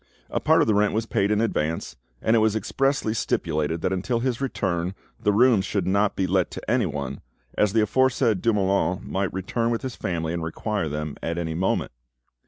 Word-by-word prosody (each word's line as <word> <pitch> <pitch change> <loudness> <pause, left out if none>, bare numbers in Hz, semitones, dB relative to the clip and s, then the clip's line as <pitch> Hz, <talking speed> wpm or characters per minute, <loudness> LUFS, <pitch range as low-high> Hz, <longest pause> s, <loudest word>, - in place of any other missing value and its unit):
A - - 0
part - - +4
of - - +2
the 110 - +3
rent 105 0 +2
was 110 +1 0
paid 105 -3 +1
in 105 0 +2
advance, 80 -8 -1 0.3
and 110 - +3
it - - +5
was 110 -1 +2
expressly 135 +2 0
stipulated 80 -6 -1
that 95 - 0
until 105 +6 -1
his 125 0 -1
return 95 -8 -1 0.2
the 105 - +2
rooms 115 -1 +4
should 95 -1 -1
not 100 +2 +2
be 95 - 0
let 95 0 +1
to - - -9
anyone, 75 - -1 0.3
as 105 -2 +2
the 115 - +4
aforesaid 115 -2 +2
Dumoulin 100 -4 +1
might 95 0 -2
return 115 +5 -1
with 115 +1 -1
his 130 -3 -4
family 85 -2 -2
and 85 - -2
require 90 +2 -2
them 75 0 -4
at 85 +1 -3
any 80 -2 -2
moment. 90 +4 0
100 Hz, 195 wpm, -24 LUFS, 85-115 Hz, 0.3 s, it